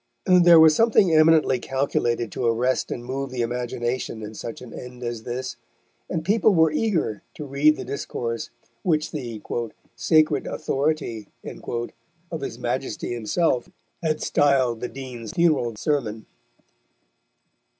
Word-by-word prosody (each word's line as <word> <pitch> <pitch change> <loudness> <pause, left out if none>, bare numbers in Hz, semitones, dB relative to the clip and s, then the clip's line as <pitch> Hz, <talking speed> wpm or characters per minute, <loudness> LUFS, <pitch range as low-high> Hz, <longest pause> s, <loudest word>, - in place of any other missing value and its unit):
There 175 -2 +7
was 160 -1 +8
something 210 -5 +4
eminently 155 -4 +5
calculated 120 -4 -1
to 120 - -1
arrest 120 +3 +1
and 120 - -5
move 135 +2 -3
the 125 -2 -2
imagination 120 -1 -3
in 105 +1 -7
such 115 +1 -7
an 125 -2 -11
end 125 0 -9
as 120 -2 -4
this, 125 +2 -4 0.5
and 160 -1 -3
people 210 +1 +3
were 160 -1 +5
eager 160 - 0
to 150 - -6
read 145 +3 +3
the - - -6
discourse 115 -4 -4 0.3
which 155 0 0
the 120 -7 -5 0.6
"sacred 155 +6 +3
authority" 135 -7 -2 0.2
of 140 +8 -7
his 135 - -5
Majesty 125 0 -3
himself 120 +3 0 0.3
had 155 -2 -1
styled 135 -6 +2
the 125 - -3
Dean's 130 -1 -8
funeral 155 -10 +2
sermon. 110 -4 -2
130 Hz, 130 wpm, -24 LUFS, 120-155 Hz, 0.6 s, was